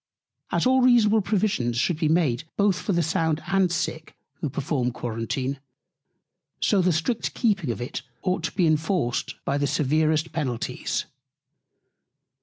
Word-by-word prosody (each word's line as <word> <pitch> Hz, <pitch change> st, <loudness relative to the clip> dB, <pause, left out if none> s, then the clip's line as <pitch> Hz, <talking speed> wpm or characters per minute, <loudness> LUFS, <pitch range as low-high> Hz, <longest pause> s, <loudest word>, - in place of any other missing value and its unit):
As -, -, +1 dB
all 260 Hz, +1 st, +4 dB
reasonable 225 Hz, -4 st, +5 dB
Provisions 190 Hz, -, 0 dB
should 155 Hz, +6 st, +1 dB
be 155 Hz, -, +1 dB
made 155 Hz, -4 st, +1 dB
both 200 Hz, -3 st, +2 dB
for -, -, -2 dB
the 170 Hz, -2 st, +2 dB
Sound 160 Hz, 0 st, 0 dB
and 190 Hz, -2 st, +2 dB
Sick, 160 Hz, -2 st, -3 dB, 0.2 s
who 150 Hz, -, -2 dB
perform 135 Hz, -2 st, -1 dB
Quarentine; 125 Hz, +3 st, -3 dB, 1.0 s
so 200 Hz, -3 st, +3 dB
the 180 Hz, 0 st, +3 dB
strict 175 Hz, +9 st, -1 dB
keeping 200 Hz, -, +1 dB
of 115 Hz, -, -2 dB
it 120 Hz, -, -4 dB, 0.2 s
ought 185 Hz, -1 st, 0 dB
to -, -, -2 dB
be 185 Hz, -3 st, +3 dB
inforced 155 Hz, -4 st, 0 dB
by 140 Hz, +1 st, 0 dB
the 145 Hz, -, +1 dB
severest 155 Hz, +3 st, +1 dB
Penalties. 130 Hz, -8 st, -2 dB
160 Hz, 145 wpm, -25 LUFS, 140-190 Hz, 1.0 s, reasonable